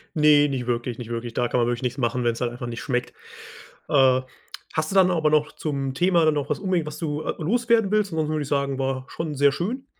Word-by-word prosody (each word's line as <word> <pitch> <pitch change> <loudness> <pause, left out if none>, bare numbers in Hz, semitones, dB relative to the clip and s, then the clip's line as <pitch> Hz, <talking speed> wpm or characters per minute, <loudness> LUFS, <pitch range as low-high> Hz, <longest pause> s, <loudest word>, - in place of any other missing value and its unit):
Ne, 150 -2 +5
nicht 125 -3 -3
wirklich, 120 0 -2
nicht 120 -2 -8
wirklich. 120 0 -4
Da 120 +1 0
kann 125 - 0
man 120 - +2
wirklich 120 +1 -2
nichts 125 +1 -2
machen, 125 -1 -1
wenn's 120 0 -1
halt 120 - 0
einfach 120 0 -6
nicht 120 0 -6
schmeckt. 125 -2 -2 0.8
Äh, 130 -2 +4 0.5
hast 155 +1 -1
du - - -4
dann 190 -1 +6
aber 160 -3 +2
noch 150 -1 +1
zum 140 -3 -3
Thema 175 +3 +3
dann 155 - +4
noch 145 - -2
was - - -1
unbedingt, 185 -5 -1
was 150 - -6
du, 150 -2 -3
äh, - - -2
loswerden 230 +2 +2
willst? 210 -2 +1
Ansonsten 155 -1 -1
würde 150 - -1
ich 140 - -8
sagen, 140 -1 0
war 130 -1 -2
schon 155 -3 -5
sehr 140 +1 +4
schön. 235 - -3
145 Hz, 245 wpm, -24 LUFS, 125-160 Hz, 0.8 s, dann